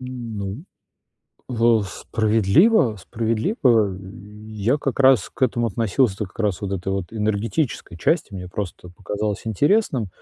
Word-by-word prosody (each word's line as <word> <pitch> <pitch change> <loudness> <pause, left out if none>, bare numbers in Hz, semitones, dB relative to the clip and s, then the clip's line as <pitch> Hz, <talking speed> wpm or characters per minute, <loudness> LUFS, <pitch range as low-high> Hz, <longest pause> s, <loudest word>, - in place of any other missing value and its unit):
Ну, 115 -2 -6 0.9
в 115 -3 +3
справедливо 110 - +2
справедливо, 115 - +1
э. - - -9 0.5
Я 110 +6 0
как 135 -1 -2
раз 130 -2 +5
к - - -10
этому 120 -2 +2
относился, 110 0 +1
та 105 - -1
как 90 - -20
раз 105 -3 0
вот 100 -1 -4
этой 95 0 -2
вот 95 0 -4
энергетической 110 - -2
части. 155 - +1
Мне 90 -1 -6
просто 90 -2 -6
показалось 105 +3 -4
интересным. 135 - +1
110 Hz, 135 wpm, -22 LUFS, 100-125 Hz, 0.9 s, раз